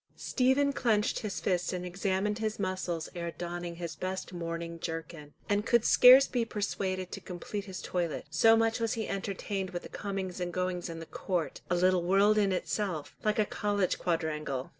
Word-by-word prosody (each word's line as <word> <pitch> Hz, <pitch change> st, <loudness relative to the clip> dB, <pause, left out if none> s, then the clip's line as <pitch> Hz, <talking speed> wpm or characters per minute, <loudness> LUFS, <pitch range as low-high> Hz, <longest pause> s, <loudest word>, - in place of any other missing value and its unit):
Stephen 275 Hz, +2 st, +2 dB
clenched 225 Hz, -5 st, +1 dB
his 210 Hz, -2 st, -4 dB
fist 180 Hz, -2 st, 0 dB
and 180 Hz, -1 st, -4 dB
examined 195 Hz, +3 st, -1 dB
his 220 Hz, -1 st, -2 dB
muscles 185 Hz, -4 st, -2 dB
ere 170 Hz, -1 st, -3 dB
donning 175 Hz, 0 st, -5 dB
his 170 Hz, -1 st, -5 dB
best 185 Hz, 0 st, -4 dB
mourning 170 Hz, -1 st, -4 dB
jerkin, 165 Hz, -2 st, -6 dB, 0.2 s
and 205 Hz, 0 st, +1 dB
could 235 Hz, -1 st, +4 dB
scarce 255 Hz, +2 st, +9 dB
be 245 Hz, -2 st, 0 dB
persuaded 190 Hz, -4 st, -2 dB
to 195 Hz, -, -6 dB
complete 190 Hz, +3 st, -6 dB
his 190 Hz, -2 st, -7 dB
toilet, 175 Hz, -3 st, -2 dB
so 225 Hz, +8 st, +6 dB
much 225 Hz, +1 st, +2 dB
was 230 Hz, -1 st, 0 dB
he 220 Hz, -1 st, -3 dB
entertained 195 Hz, 0 st, -3 dB
with 175 Hz, -1 st, -5 dB
the -, -, -9 dB
comings 195 Hz, -3 st, -4 dB
and 175 Hz, -1 st, -3 dB
goings 180 Hz, -1 st, -2 dB
in 165 Hz, 0 st, -6 dB
the 165 Hz, -, -7 dB
court, 175 Hz, 0 st, -3 dB
a 175 Hz, -, +2 dB
little 180 Hz, 0 st, +3 dB
world 200 Hz, +4 st, +4 dB
in 200 Hz, -2 st, +2 dB
itself, 185 Hz, -4 st, -2 dB
like 215 Hz, -1 st, +1 dB
a 215 Hz, -, +3 dB
college 205 Hz, -2 st, 0 dB
quadrangle. 155 Hz, -6 st, -2 dB
185 Hz, 185 wpm, -30 LUFS, 175-210 Hz, 0.2 s, scarce